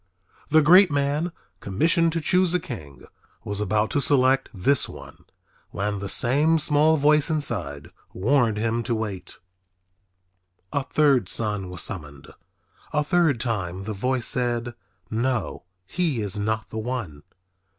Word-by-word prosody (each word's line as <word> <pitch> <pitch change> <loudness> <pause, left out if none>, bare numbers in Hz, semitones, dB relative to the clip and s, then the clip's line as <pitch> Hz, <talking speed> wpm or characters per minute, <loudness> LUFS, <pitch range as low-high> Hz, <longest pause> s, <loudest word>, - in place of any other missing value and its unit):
The 155 0 +4
great 180 +5 +7
man 145 +4 -1 0.3
commissioned 165 - +1
to 165 - -2
choose 180 +2 +2
a - - +2
king 80 - -10 0.4
was 100 0 -4
about 105 +1 0
to 145 - 0
select 135 -1 +2
this 120 +7 +3
one - - -13 0.4
when 100 +2 -3
the 100 0 -5
same 145 +10 +2
voice 150 0 +3
inside 105 - -2 0.2
warned 115 +1 +1
him 115 +2 -1
to 120 0 -2
wait. 100 -5 -6 1.4
A 145 - +1
third 140 -5 +2
son 105 -4 -2
was 90 -2 -1
summoned. 75 -7 -7 0.6
A 150 -1 +1
third 160 -5 +1
time 95 -6 -3
the 110 +2 -5
voice 125 +4 -2
said, 120 -1 -1 0.4
"No, 120 -1 -2 0.2
he 160 - -1
is 100 0 -1
not 110 +1 -3
the 110 - -4
one." 110 - -5
120 Hz, 135 wpm, -24 LUFS, 105-150 Hz, 1.4 s, great